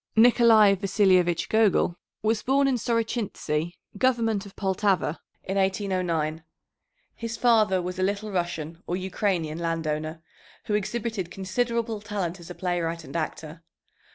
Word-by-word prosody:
Nicolay 225 -3 +6
Vasilyevich 185 -3 +2
Gogol 215 -5 +3 0.3
was 215 0 +1
born 275 +2 +2
in 265 - +2
Sorochintzy, 220 -9 -1 0.2
government 225 -5 +1
of 195 - -15
Poltava, 190 -4 0 0.2
in 195 +1 -3
1809. 185 -5 0 0.7
His 230 0 -5
father 215 -6 +4
was 180 +1 -5
a - - 0
Little 200 +2 -1
Russian, 170 -3 -3
or 175 - -1
Ukrainian, 185 -4 -1
landowner, 160 -1 -2 0.4
who 210 - -2
exhibited 210 -2 -2
considerable 225 +4 -2
talent 195 -4 -3
as 170 0 -12
a 180 - -7
playwright 170 -2 -2
and 135 +1 -11
actor. 160 0 -4
190 Hz, 125 wpm, -26 LUFS, 170-220 Hz, 0.7 s, Nicolay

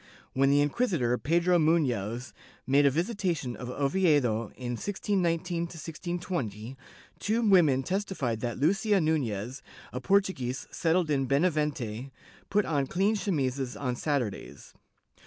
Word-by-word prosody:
When 135 +1 +3
the 145 +1 +4
inqui 245 - 0
sitor 125 -10 +1
Pedro 170 +4 +3
Mufioz 125 -8 0 0.3
made 140 +2 +4
a - - +6
visitation 170 - -1
of 125 - -7
Oviedo 135 - +1
in 125 -1 -5
1619 175 - -1 0.5
20, 130 - -4 0.4
two 220 +3 0
women 155 -9 +5
testified 180 - -2
that 120 0 -3
Lucia 195 - +2
Nunez, 130 - -1 0.3
a 125 - -4
Portuguese 160 -8 0
settled 165 -1 +1
in 135 -2 +1
Bena 145 +7 +3
vente, 135 -5 -3 0.4
put 205 +1 +2
on 145 -4 0
clean 195 +8 +1
chemises 135 -10 -1
on 125 -3 -1
Saturdays. 130 -7 -3
145 Hz, 125 wpm, -28 LUFS, 125-180 Hz, 0.5 s, a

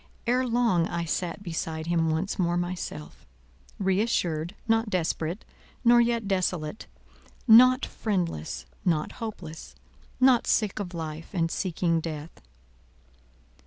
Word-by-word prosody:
Ere 250 +2 +2
long 230 -8 +2
I 170 0 -3
sat 175 +3 -3
beside 160 -2 -4
him 165 -1 +1
once 165 +6 -1
more 175 -1 +1
myself—re 80 - -4
assured, 175 -5 -1
not 225 0 +2
desperate, 170 0 -2 0.4
nor 240 0 +7
yet 235 -3 0
desolate; 185 -2 -1 0.6
not 255 +3 +7
friendless, 175 - -3 0.2
not 160 -4 +1
hopeless, 165 - -7 0.4
not 255 -2 +5
sick 215 -1 +1
of 180 -3 -5
life, 160 0 -6
and 165 -3 0
seeking 170 -2 0
death. 155 -1 -7
175 Hz, 115 wpm, -27 LUFS, 160-215 Hz, 0.6 s, nor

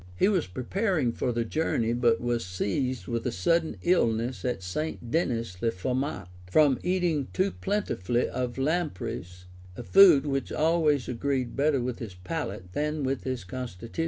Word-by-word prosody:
He 140 - +3
was 190 -6 +1
preparing 150 - 0
for 125 - -1
the 115 0 -1
journey, 115 -4 0
but 120 -1 +3
was 120 -1 -1
seized 100 +5 -2
with 115 +2 -2
a - - 0
sudden 165 +5 +1
illness 120 -8 +1
at 120 -7 -2
St. 120 - -4
Dennis 115 - -1
le 115 - +2
Forment, 125 0 -2 0.2
from 145 +4 +4
eating 175 -6 0
too 190 +1 +1
plentifully 125 - -1
of 125 -1 -3
lampreys, 135 - -2 0.3
a 120 - -5
food 175 -3 +7
which 135 -2 -2
always 155 -4 +2
agreed 125 -1 -1
better 140 -1 +2
with 125 0 -3
his 105 -6 -7
palate 95 - -5
than 150 0 -1 0.2
his 130 -4 -3
constitution. 115 - -7
125 Hz, 155 wpm, -28 LUFS, 115-155 Hz, 0.3 s, food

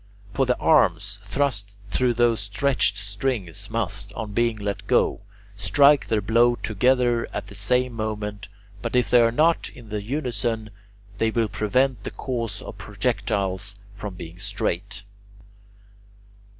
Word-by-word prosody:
For 135 -2 +1
the 125 - +2
arms 100 - +3
thrust 105 -3 -2
through 125 -2 +2
those 120 -1 +3
stretched 105 0 +1
strings 100 -2 -3
must, 100 -3 -2
on 105 -1 -5
being 115 0 +1
let 100 -1 -4
go, - - +2 0.3
strike 140 +9 +4
their 110 -2 +1
blow 120 +4 +4
together 120 +2 +2
at - - -4
the - - -12
same 125 0 +1
moment; 105 -2 -4 0.3
but 115 +2 -3
if 125 - +2
they 120 -1 +7
are 115 0 +4
not 160 +7 +2
in 115 -4 -14
unison, 115 -1 -2 0.5
they 115 - +3
will 115 0 +1
prevent 110 +3 +1
the - - -3
course 115 -6 -4
of - - -9
projectiles 100 0 -2 0.2
from 105 -2 -6
being 85 0 -9
straight. 100 0 -3
110 Hz, 135 wpm, -24 LUFS, 100-125 Hz, 0.5 s, they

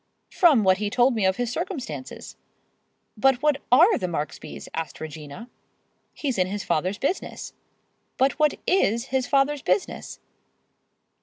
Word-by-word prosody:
"From 300 - +4
what 185 0 +3
he 210 -1 -1
told 245 +3 +3
me 215 -4 0
of 190 - +1
his 245 -1 -2
circumstances." 285 -5 -6 0.8
"But 265 +4 +2
what 300 -2 +3
are 350 - +6
the 180 - -2
Marksbys?" 155 -3 -5
asked 165 -1 -5
Regina. 155 +6 -8 0.7
"He's 265 -8 -2
in 185 - +2
his 205 +1 -4
father's 185 +6 -1
business." 315 - -3 0.6
"But 270 +3 +1
what 300 -1 +3
is 235 - +1
his 260 -1 +1
father's 275 +1 +2
business?" 185 -1 -2
245 Hz, 140 wpm, -24 LUFS, 190-275 Hz, 0.8 s, are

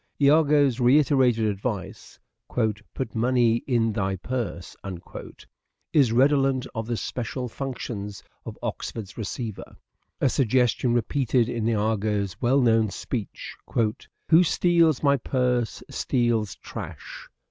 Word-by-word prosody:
lago's 145 -3 +4
reiterated 125 -3 +4
advice, 105 0 -4 0.2
" - - -57 0.5
Put 130 -4 -4
money 120 0 +2
in 115 -4 +1
thy 95 -2 -1
purse," 110 -3 -4 1.2
is 135 -7 +4
redolent 135 +1 +3
of 110 -1 -4
the 120 -1 -1
special 125 +2 -4
functions 110 -6 -6 0.2
of - - -8
Oxford's 105 -4 -5
receiver: 110 0 -6 0.4
a - - +3
suggestion 125 -1 +2
repeated 125 -1 +1
in 115 -2 -2
lago's 105 -3 0
well 130 +3 +3
known 115 -3 +3
speech 110 +1 -5 0.4
" - - -23
Who 165 +1 +7
steals 170 -3 +3
my 140 -1 +4
purse 125 -2 -1
steals 115 -5 0
trash." - - -9
120 Hz, 115 wpm, -25 LUFS, 110-135 Hz, 1.2 s, Who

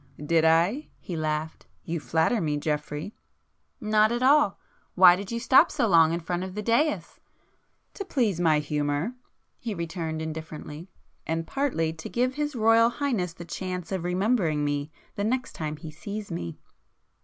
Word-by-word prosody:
"Did 160 +2 +1
I?" 170 - +3
He 175 - -7
laughed. 155 0 -3 0.2
"You 170 0 -3
flatter 160 - +1
me 150 -2 0
Geoffrey." 150 +5 -3 0.7
"Not 215 0 +3
at 240 +1 -1
all. 275 -6 +4 0.4
Why 180 -1 +8
did 195 +3 -6
you 235 - -2
stop 240 +2 +5
so - - 0
long 165 -4 +5
in 170 - -1
front 175 +2 -3
of 185 0 -7
the 210 - -3
daïs?" 285 +8 0 0.7
"To 400 - -5
please 235 - 0
my 160 -3 +4
humour!" 150 - -1 0.5
he 225 -4 -4
returned 165 -2 -4
indifferently—"And 160 +1 -7
partly, 200 - -1
to 160 -1 -8
give 250 +2 0
his 295 0 -3
Royal 225 0 +5
Highness 235 - -2
the 170 - -10
chance 180 +1 -5
of 190 -3 -2
remembering 180 -4 +1
me 145 0 -2 0.2
the 200 - -3
next 250 +4 -1
time 155 -1 -4
he 155 +1 -9
sees 200 +5 -7
me." 85 - -5
175 Hz, 160 wpm, -26 LUFS, 160-225 Hz, 0.7 s, Why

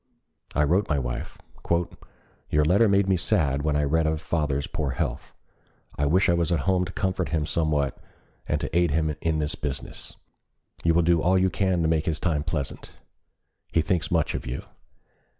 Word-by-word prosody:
I 75 - +3
wrote 90 +7 +2
my 75 - +2
wife: 60 -3 -4 1.1
"Your 75 0 +3
letter 100 +7 +4
made 100 0 +3
me 95 -1 +3
sad 70 -4 +1
when 75 0 0
I 75 - +2
read 80 +3 +2
of 80 0 0
father's 75 -3 -1
poor 80 -5 -3
health. - - -3 0.6
I 70 - 0
wish 90 +6 +3
I 85 - +4
was 85 0 +1
at 85 -5 +2
home 90 +1 +2
to 90 - -7
comfort 95 -1 -1
him 80 -2 0
somewhat 75 -4 0 0.5
and 75 - 0
to - - -4
aid 85 0 +4
him 80 0 0
in 80 -2 0
his 75 0 -1
business. 70 -2 -5 0.7
You 85 0 +3
will 85 - +4
do 85 -1 +3
all 95 +2 +3
you 95 0 +2
can 95 -4 +1
to - - +2
make 80 -1 +1
his 80 -2 0
time 80 -5 0
pleasant. 75 -4 -4 0.8
He 80 - +2
thinks 85 -1 0
much 80 -2 +1
of - - -5
you. 65 +2 -4
80 Hz, 190 wpm, -25 LUFS, 75-85 Hz, 1.1 s, letter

